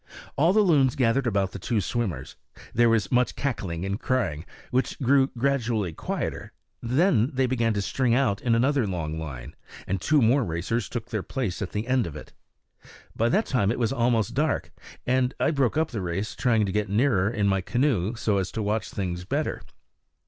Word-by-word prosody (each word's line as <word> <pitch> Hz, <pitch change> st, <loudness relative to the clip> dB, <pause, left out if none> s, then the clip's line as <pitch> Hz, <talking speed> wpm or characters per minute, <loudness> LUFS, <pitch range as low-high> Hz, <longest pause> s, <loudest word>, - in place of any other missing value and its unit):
All 160 Hz, +5 st, +4 dB
the 215 Hz, +2 st, +4 dB
loons 145 Hz, -10 st, +3 dB
gathered 125 Hz, +1 st, +2 dB
about 100 Hz, -4 st, 0 dB
the -, -, -7 dB
two 110 Hz, +4 st, 0 dB
swimmers; 95 Hz, -, -3 dB, 0.4 s
there 120 Hz, 0 st, +4 dB
was 110 Hz, -4 st, +1 dB
much 125 Hz, 0 st, +2 dB
cackling 95 Hz, -10 st, -3 dB
and 100 Hz, +2 st, -2 dB
crying, 90 Hz, -, -1 dB, 0.3 s
which 130 Hz, +1 st, 0 dB
grew 135 Hz, 0 st, +4 dB
gradually 115 Hz, -8 st, 0 dB
quieter; -, -, -4 dB, 0.3 s
then 125 Hz, -, +2 dB
they 130 Hz, 0 st, +2 dB
began 120 Hz, -3 st, +1 dB
to 100 Hz, -, -1 dB
string 125 Hz, +2 st, +1 dB
out 115 Hz, -7 st, +1 dB
in 115 Hz, -2 st, +2 dB
another 130 Hz, 0 st, +2 dB
long 80 Hz, -4 st, -3 dB
line, 70 Hz, -3 st, -7 dB, 0.3 s
and 95 Hz, -1 st, -2 dB
two 155 Hz, -, +3 dB
more 125 Hz, +3 st, +4 dB
racers 95 Hz, +5 st, -2 dB
took 120 Hz, 0 st, -5 dB
their 110 Hz, -3 st, -1 dB
places 110 Hz, -4 st, -3 dB
at 95 Hz, -, -5 dB
one 105 Hz, +2 st, -1 dB
end 130 Hz, -4 st, +1 dB
of 80 Hz, -, -8 dB
it. 75 Hz, -, -10 dB, 0.8 s
By 115 Hz, +1 st, +2 dB
that 210 Hz, -, +2 dB
time 120 Hz, -7 st, +1 dB
it -, -, -2 dB
was 115 Hz, 0 st, 0 dB
almost 120 Hz, -2 st, +1 dB
dark, 150 Hz, +4 st, 0 dB, 0.3 s
and 125 Hz, 0 st, +1 dB
I -, -, +2 dB
broke 140 Hz, -2 st, +1 dB
up 160 Hz, -1 st, +1 dB
the 110 Hz, -5 st, -3 dB
race 90 Hz, +4 st, -3 dB
trying 115 Hz, -4 st, +2 dB
to 95 Hz, -, -2 dB
get 105 Hz, 0 st, -1 dB
nearer 105 Hz, -3 st, +2 dB
in 105 Hz, -3 st, 0 dB
my 95 Hz, -1 st, +2 dB
canoe 120 Hz, -3 st, 0 dB
so 105 Hz, -3 st, 0 dB
as 95 Hz, -1 st, -3 dB
to 110 Hz, -, -2 dB
watch 105 Hz, +2 st, -1 dB
things 90 Hz, -3 st, -4 dB
better. 90 Hz, -, -2 dB
115 Hz, 195 wpm, -26 LUFS, 95-130 Hz, 0.8 s, All